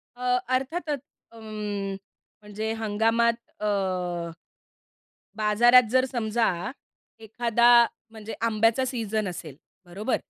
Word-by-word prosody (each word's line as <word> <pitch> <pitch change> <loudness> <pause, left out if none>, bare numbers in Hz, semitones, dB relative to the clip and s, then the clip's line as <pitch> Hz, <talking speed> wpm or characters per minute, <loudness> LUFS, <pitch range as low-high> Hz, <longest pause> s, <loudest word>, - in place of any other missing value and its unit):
अ, 250 0 +1 0.2
अर्थातच. 295 +2 -2 0.3
उम्म, 210 -3 -5 0.5
म्हणजे 210 +1 -4
हंगामात 225 +2 +1 0.3
अ, - - -2 1.7
बाजारात 230 +3 +5
जर 260 +1 +4
समजा 230 -2 0 0.8
एखादा, 235 +1 0 0.5
म्हणजे 220 0 -8
आंब्याचा 225 +3 +2
सीझन 220 -5 -2
असेल, 165 -6 -7 0.3
बरोबर? 200 +8 -2
225 Hz, 85 wpm, -26 LUFS, 210-240 Hz, 1.7 s, बाजारात